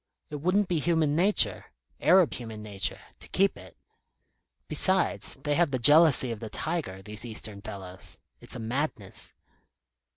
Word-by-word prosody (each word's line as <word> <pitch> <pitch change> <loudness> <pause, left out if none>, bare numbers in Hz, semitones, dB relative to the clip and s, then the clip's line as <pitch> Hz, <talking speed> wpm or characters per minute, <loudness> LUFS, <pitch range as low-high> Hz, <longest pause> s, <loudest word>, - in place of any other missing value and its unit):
It 150 - -4
wouldn't 185 +7 +1
be 175 -3 0
human 160 -2 +1
nature 170 - +2 0.3
Arab 180 -2 +4
human 110 -3 -7
nature 100 -2 -2 0.2
to - - -12
keep 195 +1 +2
it. - - -14 0.9
Besides, 190 -1 +1
they 145 - 0
have 170 +1 +2
the 130 - -1
jealousy 145 0 +6
of 115 - -5
the 110 - -7
tiger, 95 - -4
these 105 +2 -2
Eastern 110 -3 -4
fellows. 95 -2 -7 0.2
It's - - -5
a - - -6
madness." 115 -3 -4
135 Hz, 150 wpm, -27 LUFS, 105-170 Hz, 0.9 s, jealousy